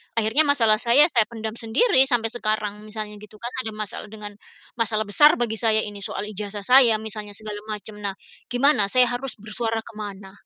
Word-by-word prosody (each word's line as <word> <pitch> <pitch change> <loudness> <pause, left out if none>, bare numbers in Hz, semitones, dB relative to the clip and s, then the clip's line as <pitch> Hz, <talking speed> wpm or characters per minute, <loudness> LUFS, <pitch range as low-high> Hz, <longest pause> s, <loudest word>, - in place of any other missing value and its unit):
akhirnya 230 +8 +3
masalah 225 -7 +3
saya, 245 +5 +5
saya 230 -5 +3
pendam 225 -1 -6
sendiri 260 - +2
sampai 230 -3 0
sekarang 215 -2 -3
misalnya, 210 -1 -7
gitu 210 0 -14
kan. 235 +3 -6
Ada 220 - -6
masalah 215 0 -6
dengan 210 -1 -9 0.5
masalah 220 -1 0
besar 295 +9 +5
bagi 225 -3 -2
saya, 220 -2 +3
ini 205 -1 -6
soal 200 - -5
ijazah 205 0 -6
saya 250 -1 +6
misalnya, 215 -1 -7
segala 210 -1 -6
macam, 210 0 -6
nah, 200 -2 -3 0.3
gimana 245 -4 +2
saya 255 +4 +4
harus 255 +2 -4
bersuara 225 +2 -4
ke 230 - -12
mana? 195 -2 -8
220 Hz, 185 wpm, -23 LUFS, 210-235 Hz, 0.5 s, saya